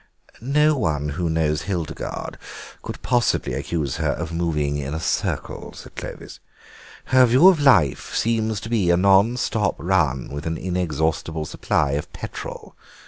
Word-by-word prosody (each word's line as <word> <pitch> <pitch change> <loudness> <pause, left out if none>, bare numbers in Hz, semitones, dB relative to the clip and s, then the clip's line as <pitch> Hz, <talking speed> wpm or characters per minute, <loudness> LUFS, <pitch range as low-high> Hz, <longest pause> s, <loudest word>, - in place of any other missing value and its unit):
"No 150 +5 +3
one 75 - -1
who 85 +3 -2
knows 80 -1 +1
Hildegarde 90 -6 -4 0.4
could - - -7
possibly 120 -2 +1
accuse 75 -6 -2
her - - 0
of 85 -1 -5
moving 75 -4 -1
in 70 +2 -4
a - - -3
circle," - - -2
said - - -12
Clovis; - - -8 0.7
"her 130 -1 +5
view 130 +10 +6
of 180 -5 +3
life 125 - +3
seems 110 -2 0
to 110 - -7
be 105 -7 +1
a 85 - +4
non 100 +5 +4
stop 105 -6 0
run 80 -8 0
with 75 +3 -5
an 80 0 -2
inexhaustible 80 -3 -1
supply 75 -1 0
of 75 +2 -3
petrol. - - -8
85 Hz, 150 wpm, -22 LUFS, 75-110 Hz, 0.7 s, view